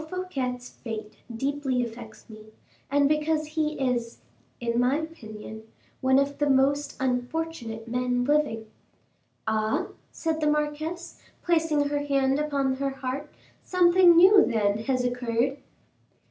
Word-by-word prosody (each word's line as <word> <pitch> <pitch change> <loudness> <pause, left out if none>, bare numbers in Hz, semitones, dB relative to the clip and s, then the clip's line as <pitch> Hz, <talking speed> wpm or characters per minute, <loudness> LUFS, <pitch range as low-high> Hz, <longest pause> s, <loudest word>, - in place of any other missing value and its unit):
Fouquet's 265 -10 -3
fate 220 -2 -8 0.2
deeply 270 -1 -1
affects 235 0 -9
me, 215 -2 -12 0.4
and 285 0 +3
because 305 +1 +1
he 305 0 -1
is, 245 -3 -1 0.4
in 235 0 -1
my 250 +3 +3
opinion, 220 -9 -8 0.4
one 260 0 +3
of 280 +1 0
the 290 -1 +2
most 280 +2 +2
unfortunate 250 -2 -3
men 245 +1 0
living." 290 -6 +1 0.8
"Ah!" 220 +10 0 0.2
said 320 -1 -2
the 300 - +2
marquise, 300 +3 -2 0.2
placing 315 -4 +2
her 290 0 0
hand 275 -1 +1
upon 280 -3 0
her 275 0 -1
heart, 270 +2 -5 0.3
"something 355 -1 +5
new, 390 +3 +8
then, 210 -3 +1
has 255 -2 +1
occurred?" 245 +2 0
275 Hz, 125 wpm, -26 LUFS, 245-300 Hz, 0.8 s, new